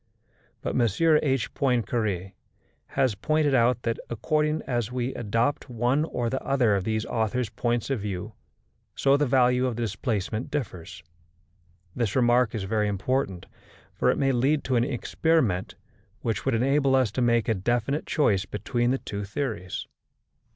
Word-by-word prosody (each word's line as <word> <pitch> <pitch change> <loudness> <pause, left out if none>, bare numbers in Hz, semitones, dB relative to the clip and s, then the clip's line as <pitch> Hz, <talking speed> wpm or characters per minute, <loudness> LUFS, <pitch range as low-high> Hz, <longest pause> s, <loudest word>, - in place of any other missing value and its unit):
But - - -2
M.H. 135 - +2
Poincaré 110 -7 0 0.6
has 130 -4 +3
pointed 150 +7 +1
out 120 -1 +3
that, 115 -1 -1
according 150 +6 0
as 120 -2 -2
we 125 +1 -2
adopt 120 +6 -1
one 125 +5 +1
or 120 -6 -2
other 125 -6 +2
of 95 -1 -1
these 110 0 -1
authors' 110 +1 -1
points 120 +2 -1
of 135 - 0
view, 100 -3 -5 0.6
so 135 0 +3
the 145 0 +2
value 125 0 +3
of 125 - -2
the 120 - -2
displacement 110 0 -2
differs. 95 - -5 0.9
This 115 -5 -1
remark 120 -2 +3
is 105 - -2
very 105 +2 0
important, 100 -1 -1 0.5
for - - +1
it - - +2
may 135 -1 +2
lead 135 +4 +2
to 130 - 0
an 120 - +3
experiment 125 - 0 0.5
which 115 -2 -2
would - - +2
enable 135 +3 +3
us 130 -6 +2
to 130 - -2
make 115 -2 +2
a 115 - +3
definite 120 +8 -1
choice 100 -11 +2
between 120 +4 -1
the 130 - +2
two 100 -5 -5
theories. 100 -4 -4
120 Hz, 150 wpm, -26 LUFS, 110-135 Hz, 0.9 s, has